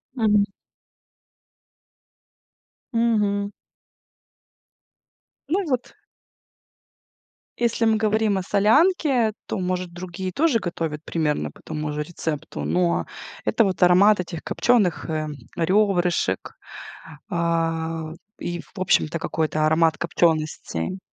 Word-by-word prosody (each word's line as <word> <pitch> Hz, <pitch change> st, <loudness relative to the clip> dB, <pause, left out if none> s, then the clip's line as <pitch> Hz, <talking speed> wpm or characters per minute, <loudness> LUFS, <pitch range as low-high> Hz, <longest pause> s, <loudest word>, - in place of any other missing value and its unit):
Мгм. 210 Hz, -3 st, +3 dB, 2.5 s
Мгм. 210 Hz, -3 st, +1 dB, 2.0 s
Ну 375 Hz, +6 st, +1 dB
и -, -, -5 dB
вот 255 Hz, -3 st, -2 dB, 1.6 s
Если 235 Hz, -1 st, +1 dB
мы 220 Hz, 0 st, +4 dB
говорим 215 Hz, -2 st, +1 dB
о 185 Hz, -, -2 dB
солянке, 245 Hz, -, +3 dB
то, -, -, -2 dB
может, 180 Hz, -1 st, -2 dB
другие 185 Hz, +1 st, -5 dB
тоже 280 Hz, -, +2 dB
готовят 160 Hz, -4 st, -4 dB
примерно 155 Hz, -3 st, -1 dB
по -, -, -18 dB
тому 150 Hz, -1 st, -4 dB
же 150 Hz, 0 st, -2 dB
рецепту, 150 Hz, -, -5 dB
но 85 Hz, 0 st, +1 dB, 0.4 s
это 110 Hz, -, +3 dB
вот 185 Hz, -3 st, -1 dB
аромат 185 Hz, +3 st, +6 dB
этих 170 Hz, -2 st, -5 dB
копчёных, 205 Hz, -9 st, +1 dB
э, 155 Hz, -1 st, -1 dB, 0.3 s
рёбрышек, 180 Hz, -, +1 dB, 0.8 s
а, 165 Hz, -1 st, -1 dB, 0.3 s
и, 175 Hz, -1 st, -4 dB
в -, -, -14 dB
общем-то, 170 Hz, -3 st, +2 dB
какой-то 155 Hz, -1 st, 0 dB
аромат 160 Hz, 0 st, +3 dB
копчёностей. 160 Hz, -, -1 dB
180 Hz, 100 wpm, -23 LUFS, 160-210 Hz, 2.5 s, аромат